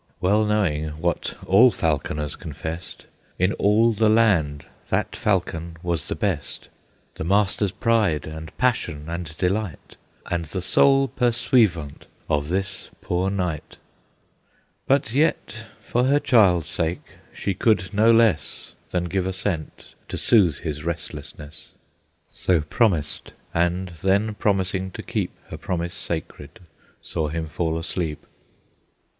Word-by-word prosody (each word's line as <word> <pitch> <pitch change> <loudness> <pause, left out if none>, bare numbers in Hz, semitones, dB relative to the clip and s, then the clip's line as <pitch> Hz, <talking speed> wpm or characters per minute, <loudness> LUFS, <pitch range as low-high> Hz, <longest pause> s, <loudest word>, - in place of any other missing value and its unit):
Well 105 +4 +3
knowing, 90 -8 +1
what 85 0 -2
all 115 +7 +7
falconers 75 - -1
confessed, 80 +1 -7 0.3
In 90 +4 +2
all 110 +3 +3
the 110 +1 +3
land 90 - +3 0.2
that - - 0
falcon 85 -4 -1
was 85 -3 -1
the - - -2
best, - - -3 0.5
The - - -3
master's 100 +2 +2
pride 110 -10 +1
and 80 +1 -8
passion 95 -12 0
and 85 -2 -5
delight, 95 -2 -2 0.3
And 85 -1 -2
the 90 +4 -4
sole 135 +6 +4
pursuivant 115 - +1 0.2
of 75 0 0
this 95 +2 -2
poor 90 +2 0
knight. 90 -6 -3 1.1
But 135 -4 +2
yet, 130 -6 0
for 120 +1 0
her 140 +2 +4
child's 95 - +4
sake, 85 0 -2 0.3
she 100 - -2
could 95 -1 +1
no 110 +3 +5
less 115 -11 +2 0.2
Than 90 -1 -1
give 90 +1 -1
assent, 95 -4 -4 0.2
to - - -4
soothe 95 - +3
his 75 -2 -4
restlessness, 80 -1 -6 0.6
So 90 -4 +1
promised, 80 - 0 0.2
and 90 +2 0
then 100 +3 +2
promising 95 -2 0
to - - -7
keep - - -2 0.2
Her 80 - -6
promise 85 +1 -3
sacred, 75 -3 -5 0.4
saw 80 - -2
him 80 +1 -3
fall 80 +1 -1
asleep. 80 -2 -3
90 Hz, 125 wpm, -23 LUFS, 80-105 Hz, 1.1 s, all